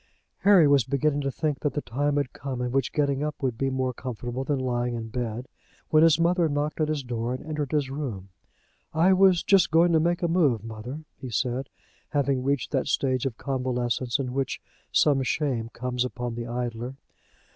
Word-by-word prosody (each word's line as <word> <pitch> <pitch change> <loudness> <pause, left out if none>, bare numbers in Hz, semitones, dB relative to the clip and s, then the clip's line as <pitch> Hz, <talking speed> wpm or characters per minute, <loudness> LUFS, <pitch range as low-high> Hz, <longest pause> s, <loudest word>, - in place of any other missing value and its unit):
Harry 195 -6 +6
was 140 -3 +5
beginning 140 +4 0
to 140 - -1
think 150 0 -2
that 145 - -1
the 145 - -1
time 145 +4 -1
had 140 -3 -1
come 130 -2 -5
in 125 0 -2
which 135 -1 0
getting 140 -2 0
up 150 -1 -2
would 130 -4 -1
be 135 +3 0
more 130 -1 -1
comfortable 125 +1 -5
than 140 +1 0
lying 125 -2 -1
in 115 -1 -5
bed, 120 +1 -4 0.4
when 155 - +5
his 165 -1 +5
mother 170 -1 +3
knocked 150 +2 -1
at 155 - +2
his 150 -2 -2
door 120 0 -2
and 130 - -9
entered 150 -3 -3
his 145 -3 0
room. 120 -10 -5 0.7
"I 175 +4 +5
was 185 -2 +5
just 195 -3 +4
going 165 +2 +4
to 160 - +5
make 175 +2 0
a - - +3
move, 150 - +2
mother," 115 +6 -7 0.2
he 130 - -6
said, 125 +3 -1 0.4
having 140 -3 +1
reached 140 -1 0
that 135 -3 0
stage 130 -1 +1
of 115 -5 -6
convalescence 125 -2 -1
in 130 -3 -3
which 135 -1 -2 0.3
some 145 -3 +4
shame 130 -4 -1
comes 125 +1 -2
upon 125 -1 -4
the 120 0 -5
idler. 120 +1 -4
135 Hz, 200 wpm, -26 LUFS, 125-150 Hz, 0.7 s, Harry